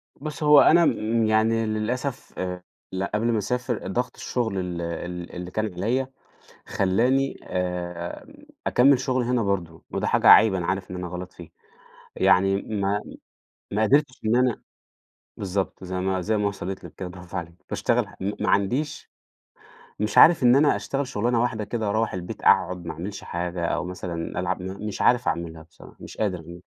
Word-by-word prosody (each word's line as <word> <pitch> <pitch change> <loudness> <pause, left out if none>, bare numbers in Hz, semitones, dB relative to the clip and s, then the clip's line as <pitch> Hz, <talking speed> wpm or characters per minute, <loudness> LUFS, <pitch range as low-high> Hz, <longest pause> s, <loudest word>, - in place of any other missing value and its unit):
بُصي، 150 +1 -5
هو 150 -1 +8
أنا 170 +1 +6
م 110 +1 +1
يعني 110 +1 +2
للأسف 115 +5 -3
آآ 90 -1 -4 0.5
قبل 105 +2 0
ما 110 - +1
أسافر 120 +1 -2
ضغط 125 +6 -2
الشغل 110 -6 -2
ال 90 -1 -4
ال 85 +1 -5
اللي 90 0 -6
كان 110 -3 -2
عليَّ 120 +9 -1 0.6
خلاني 125 +8 +1
آآ، 90 -1 -4 0.4
أكمل 130 +1 +5
شغل 130 -1 0
هنا 125 -1 +1
برضه، 90 -5 -2
وده - - -2
حاجة - - +3
عيب 105 -2 +8
أنا 90 -2 -2
عارف 95 -1 -2
إن 90 - -5
أنا 90 0 -4
غلط 90 +1 -7
فيه، 85 -2 -12 0.7
يعني 95 +1 +3
ما 100 -1 -1 0.7
ما 105 +2 +1
قدرتش 140 +2 +2
إن 110 +2 +3
أنا 125 -2 +2 0.8
بالضبط 95 -1 -3
زي 90 0 -4
ما 95 0 0
زي 110 +4 0
ما 105 -1 +1
وصلت 95 -1 -6
لِك - - -10
كده 95 -2 -6
برافو 90 -1 -9
عليكِ 85 -2 -5 0.2
باشتغل - - +1
م 100 +2 -1
ما 105 - 0
عنديش 125 +10 0 0.9
مش 105 0 0
عارف 165 -4 +8
إن 125 +1 +6
أنا 145 +1 +4
أشتغل 140 0 -2
شغلانة 120 -1 0
واحدة 110 -3 -1
كده 110 0 -3
وأروّح 110 +2 0
البيت 90 -1 -6
أقعد 90 -1 +3
ما 80 - -3
أعملش 95 +5 -7
حاجة، 85 0 -3
أو - - -1
مثلًا 90 -2 -4
ألعب - - -2
مش 100 +2 -5
عارف 125 +1 +3
أعملها 80 -2 -3
بصراحة، 80 - -17
مش - - -10
قادر. 85 -4 -3
100 Hz, 170 wpm, -25 LUFS, 90-120 Hz, 0.9 s, هو